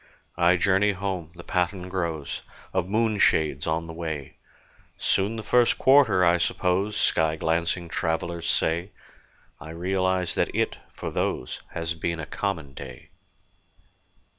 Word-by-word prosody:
I 90 +1 +5
journey 100 +2 +3
home: 95 -4 -4
the 85 - -10
pattern 90 +1 -1
grows 85 -6 -3 0.3
Of 95 -1 0
moonshades 100 -9 +2
on 80 +1 0
the 80 - -8
way: 80 -4 -5 0.6
"Soon 100 +4 +1
the 110 - -5
first 120 +3 +3
quarter, 130 -9 +5
I 85 +1 +4
suppose," 95 +4 0
Sky 80 -1 +2
glancing 85 +2 0
travellers 85 +1 -2
say; 85 +5 0 0.7
I 80 - -10
realize 95 +1 0
that - - -1
it, - - 0
for - - -6
those, 60 - -2
Has 85 +1 -2
been 85 0 -3
a 80 - -4
common 80 -9 -3
day. 65 -2 -10
85 Hz, 135 wpm, -26 LUFS, 80-95 Hz, 0.7 s, I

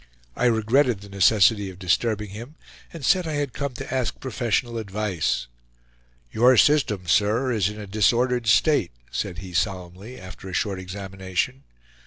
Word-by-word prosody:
I - - 0
regretted 115 0 +2
the 100 - -12
necessity 100 +1 +3
of 95 - -11
disturbing 105 +3 0
him, 120 +9 -9 0.4
and 160 -5 -7
said 180 -3 +3
I 155 - -3
had 145 -3 -2
come 140 -3 -4
to - - -6
ask 130 -3 -2
professional 120 -2 -1
advice. 100 - -2 0.9
"Your 125 +3 +5
system, 135 - +3
sir, 110 +9 +2
is 105 -4 +1
in 105 0 -8
a 105 - -6
disordered 115 +4 +1
state," 110 - +3 0.2
said 90 - -3
he 90 - -10
solemnly, 95 +6 -3
after 95 +1 -10
a - - -8
short 100 0 -1
examination. 95 +6 -4
110 Hz, 155 wpm, -24 LUFS, 95-125 Hz, 0.9 s, Your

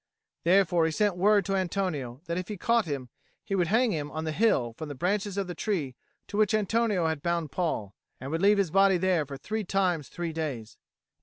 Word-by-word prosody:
Therefore 175 -2 +4
he - - -1
sent 205 +3 +1
word 200 +1 +3
to 195 - 0
Antonio, 170 -9 -2
that 170 - -3
if 180 0 -3
he 210 - -5
caught 230 +4 +2
him, 140 -5 -4 0.3
he - - -5
would 180 -3 +2
hang 230 +5 +3
him 150 -5 -3
on 155 +1 -4
the 160 - -2
hill 155 - +2
from 155 +6 -7
the 145 - -6
branches 200 +6 -1
of 200 - 0
the 180 - -5
tree 165 -11 -2 0.3
to 205 - -6
which 215 0 +3
Antonio 215 -3 +1
had 160 -3 -1
bound 170 -3 -1
Paul, 135 - -2 0.3
and 135 +2 -6
would 165 +1 -1
leave 205 +1 +5
his 195 -5 +1
body 195 0 +5
there 175 -5 +1
for 140 -1 -7
three 215 +9 -3
times 180 -6 0
three 170 -2 -4
days. 140 -9 -5
175 Hz, 220 wpm, -28 LUFS, 155-200 Hz, 0.3 s, leave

